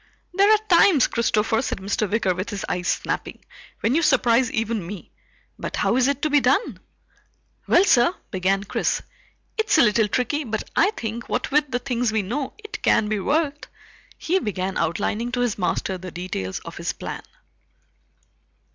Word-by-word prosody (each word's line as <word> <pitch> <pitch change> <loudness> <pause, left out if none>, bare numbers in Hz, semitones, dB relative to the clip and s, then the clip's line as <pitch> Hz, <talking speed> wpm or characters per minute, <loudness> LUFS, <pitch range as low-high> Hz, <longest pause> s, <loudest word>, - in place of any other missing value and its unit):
"There 400 +3 +4
are 435 - +7
times, 340 -5 +5
Christopher," 220 -1 +1
said - - -3
Mr. 200 +2 -2
Wicker 205 -4 +1
with 185 +5 -4
his 205 -3 -4
eyes 180 0 -2
snapping, - - -3 0.4
"when 230 - +1
you 325 - +3
surprise 250 -5 +3
even 225 -2 -1
me. 195 0 -9 0.5
But - - -4
how - - +1
is 255 0 +3
it 280 0 -1
to 310 - +2
be 290 - +5
done?" 275 - +1 0.9
"Well, 355 - +5
sir," 255 -2 +4 0.2
began 195 +1 0
Chris, 200 - -1 0.6
"it's 435 -6 +3
a - - +7
little 215 -1 +3
tricky 255 +8 -1
but 220 -4 -4
I 400 - +4
think, 230 +1 -5
what - - -2
with 295 0 +2
the 245 - 0
things 245 -2 -1
we 215 -2 0
know, 260 +8 -3
it 425 0 -9
can 210 - +3
be 215 -1 0
worked." 295 - -1 0.5
He 370 +3 0
began 190 - -3
outlining 205 +8 -1
to 250 - 0
his 240 -4 -1
master 185 0 -1
the 185 0 -7
details 170 - -4
of - - -10
his - - -2
plan. - - -6
235 Hz, 175 wpm, -23 LUFS, 200-280 Hz, 0.9 s, are